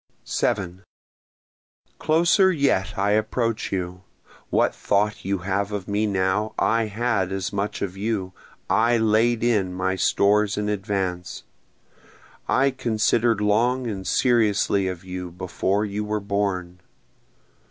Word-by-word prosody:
7 95 Hz, -2 st, -2 dB, 1.2 s
Closer 175 Hz, +4 st, +4 dB
yet 135 Hz, -, 0 dB
I 100 Hz, +1 st, +1 dB
approach 115 Hz, +2 st, 0 dB
you, 90 Hz, -1 st, -3 dB, 0.5 s
What -, -, +2 dB
thought 105 Hz, +1 st, 0 dB
you 95 Hz, -2 st, -2 dB
have 100 Hz, +1 st, -1 dB
of 100 Hz, -3 st, -4 dB
me 105 Hz, +1 st, 0 dB
now, 95 Hz, +2 st, 0 dB
I 115 Hz, 0 st, +2 dB
had 105 Hz, -3 st, -1 dB
as 95 Hz, 0 st, -3 dB
much 100 Hz, +1 st, -2 dB
of 95 Hz, -2 st, -4 dB
you 100 Hz, -2 st, -3 dB, 0.3 s
I 115 Hz, +3 st, +3 dB
laid 110 Hz, +1 st, +2 dB
in 105 Hz, -6 st, +1 dB
my 95 Hz, +1 st, -1 dB
stores 100 Hz, +3 st, +2 dB
in 105 Hz, 0 st, -1 dB
advance, 95 Hz, -3 st, -3 dB, 1.1 s
I 135 Hz, +2 st, +3 dB
consider'd 115 Hz, -3 st, +1 dB
long 120 Hz, +5 st, +2 dB
and 100 Hz, -5 st, -4 dB
seriously 105 Hz, -5 st, +2 dB
of 90 Hz, -1 st, -5 dB
you 90 Hz, -1 st, -6 dB
before 95 Hz, +3 st, -1 dB
you 105 Hz, +1 st, -3 dB
were 105 Hz, 0 st, -2 dB
born. 100 Hz, -3 st, -2 dB
105 Hz, 125 wpm, -23 LUFS, 95-115 Hz, 1.2 s, Closer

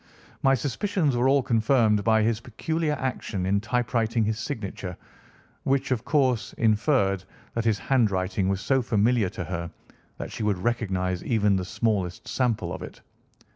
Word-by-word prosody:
My 135 Hz, 0 st, +4 dB
suspicions 145 Hz, -, 0 dB
were 125 Hz, +2 st, +3 dB
all 140 Hz, -1 st, +4 dB
confirmed 110 Hz, -2 st, +3 dB
by 110 Hz, 0 st, +4 dB
his 110 Hz, 0 st, +1 dB
peculiar 155 Hz, +7 st, -2 dB
action 125 Hz, -8 st, -3 dB
in 100 Hz, +2 st, +1 dB
typewriting 115 Hz, -1 st, 0 dB
his 110 Hz, +1 st, -1 dB
signature, 100 Hz, -, -5 dB, 0.6 s
which, 135 Hz, 0 st, 0 dB
of 120 Hz, -2 st, 0 dB
course, 130 Hz, -6 st, +1 dB
inferred 105 Hz, -3 st, +2 dB, 0.3 s
that 115 Hz, -1 st, -2 dB
his 110 Hz, -2 st, +3 dB
handwriting 100 Hz, -6 st, +1 dB
was 95 Hz, 0 st, -1 dB
so 135 Hz, +2 st, +2 dB
familiar 115 Hz, -2 st, +2 dB
to 90 Hz, -, -5 dB
her 85 Hz, +1 st, -4 dB, 0.5 s
that -, -, -6 dB
she -, -, -6 dB
would 105 Hz, -3 st, +1 dB
recognise 95 Hz, -4 st, -1 dB
even 105 Hz, -4 st, +2 dB
the 95 Hz, -1 st, -1 dB
smallest 95 Hz, -4 st, -1 dB
sample 125 Hz, -4 st, 0 dB
of -, -, -6 dB
it. -, -, -9 dB
110 Hz, 155 wpm, -26 LUFS, 100-130 Hz, 0.6 s, My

